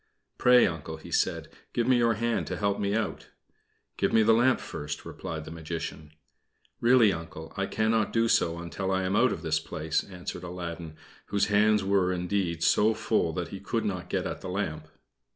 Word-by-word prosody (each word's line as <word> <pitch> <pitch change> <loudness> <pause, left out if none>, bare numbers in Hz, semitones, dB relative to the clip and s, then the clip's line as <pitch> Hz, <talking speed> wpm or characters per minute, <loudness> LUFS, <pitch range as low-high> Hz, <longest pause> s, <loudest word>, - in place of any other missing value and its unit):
"Pray, 125 0 +6
Uncle," 80 -2 -4
he 80 - -12
said, - - 0 0.3
"give 120 - +1
me 130 +1 +4
your 115 -1 +3
hand 115 +1 -1
to - - -3
help 100 -1 0
me 100 0 0
out." 110 -1 -2 0.7
"Give - - +1
me 110 - +5
the 115 +1 +5
lamp 120 +3 +4
first," 75 0 -6
replied 80 -1 -6
the - - -8
Magician. 80 -2 -6 0.7
"Really, 120 -4 +5
Uncle, 80 -1 -8
I 100 -1 -1
cannot 110 0 +1
do 115 0 +2
so 85 -6 +2
until 85 +3 -4
I 95 0 +1
am 95 +2 0
out 125 +2 +4
of 80 - -5
this 80 -1 +1
place," 80 0 -2
answered 90 -2 -7
Aladdin, 85 -2 -6 0.3
whose 100 0 +1
hands 105 0 +4
were, 95 -2 +2
indeed, 90 -2 -1
so 110 +1 +4
full - - +1
that - - -3
he - - -7
could - - -2
not - - -3
get - - -1
at - - -4
the - - -6
lamp. 80 -5 -3
95 Hz, 190 wpm, -28 LUFS, 80-110 Hz, 0.7 s, Pray